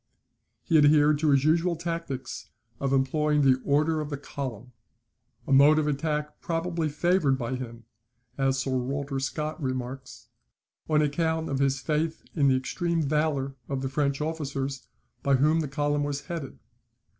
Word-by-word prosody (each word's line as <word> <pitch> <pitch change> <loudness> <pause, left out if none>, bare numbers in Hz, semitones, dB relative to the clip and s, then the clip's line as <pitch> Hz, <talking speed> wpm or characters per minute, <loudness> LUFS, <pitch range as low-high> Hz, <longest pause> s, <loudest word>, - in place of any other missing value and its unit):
He 165 -3 +4
adhered 150 0 +5
to 155 -1 +2
his 140 -1 +4
usual 170 +3 +2
tactics 165 -6 -5 0.3
of 135 -1 -1
employing 150 +2 +2
the 130 -1 +4
order 155 +2 +2
of 150 - -5
the 145 - -3
column; 130 -4 -6 0.7
a - - 0
mode 145 +3 +7
of 155 - +2
attack 150 0 -2
probably 165 -1 -1
favoured 150 -2 +2
by 120 0 -3
him 120 -2 -6 0.5
(as 135 -1 +1
Sir 135 0 -2
Walter 135 +2 -2
Scott 150 +4 -3
remarks) 130 -1 -5 0.6
on 150 -1 +4
account 160 +2 0
of 135 - -1
his 135 -1 +1
faith 155 +2 -1
in 145 -4 +3
the 130 - +4
extreme 170 +5 -1
valour 145 -2 0 0.2
of 135 -1 -2
the 135 - -1
French 140 0 0
officers 140 -4 -3 0.3
by 140 -1 +3
whom 150 +5 +3
the 155 - -1
column 145 +1 0
was 145 -1 -2
headed. 165 -7 -6
145 Hz, 155 wpm, -27 LUFS, 135-155 Hz, 0.7 s, mode